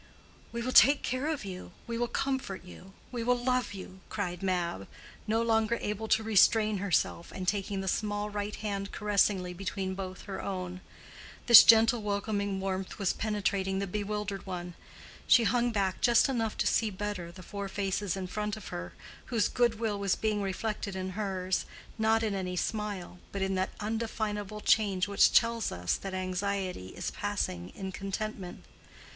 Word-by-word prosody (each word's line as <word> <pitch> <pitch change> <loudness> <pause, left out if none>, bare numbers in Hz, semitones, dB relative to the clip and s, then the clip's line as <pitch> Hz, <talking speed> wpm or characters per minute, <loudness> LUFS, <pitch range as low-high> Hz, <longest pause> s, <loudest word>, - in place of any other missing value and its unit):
"We 235 0 -3
will 255 - -1
take 280 +2 +7
care 255 +3 -1
of 310 -9 -2
you—we 190 +4 -7
will 240 +1 0
comfort 265 -8 -2
you—we 195 +6 -9
will 250 +1 +3
love 250 -3 0
you," 190 0 -9
cried 180 -5 -3
Mab, 175 - -1 0.4
no 225 +2 +2
longer 225 0 +2
able 210 +1 -3
to 220 0 +3
restrain 215 0 +4
herself, 185 -3 0
and 185 -1 -6
taking 200 0 0
the 190 - -5
small 205 +1 -1
right 205 0 -3
hand 200 -2 -4
caressingly 200 -3 +1
between 190 +1 -3
both 185 -1 -6
her 195 -2 -5
own. 185 -1 -4 0.6
This 235 -2 +12
gentle 230 +1 +6
welcoming 200 -1 -1
warmth 190 -1 -3
was 195 -2 +1
penetrating 195 -2 -1
the 200 - -1
bewildered 205 0 -3
one: 175 -1 -5 0.5
she 240 - +7
hung 240 +1 +2
back 195 -4 -1
just 240 +1 +5
enough 230 -5 -1
to - - +1
see 225 - +2
better 195 -3 -4
the 185 +1 -12
four 200 +2 -5
faces 195 -1 -1
in 190 - -3
front 210 +2 -3
of 215 - -9
her, 85 0 -6 0.3
whose 230 -4 +1
good 235 -3 +1
will 215 -3 -1
was 200 -2 +1
being 215 -2 0
reflected 200 +1 -3
in 185 0 -3
hers, 190 -2 -1 0.3
not 220 +1 +3
in 215 -2 0
any 185 -2 -3
smile, 200 -2 -3
but 195 -1 -2
in 190 0 0
that 185 0 0
undefinable 215 -1 -3
change 200 -4 +3
which 200 0 +5
tells 230 -1 +3
us 90 0 -1
that 195 -1 -5
anxiety 185 - -2
is - - -5
passing 90 0 -3
in 190 -1 -5
contentment. 195 -1 -5
200 Hz, 165 wpm, -30 LUFS, 190-220 Hz, 0.6 s, This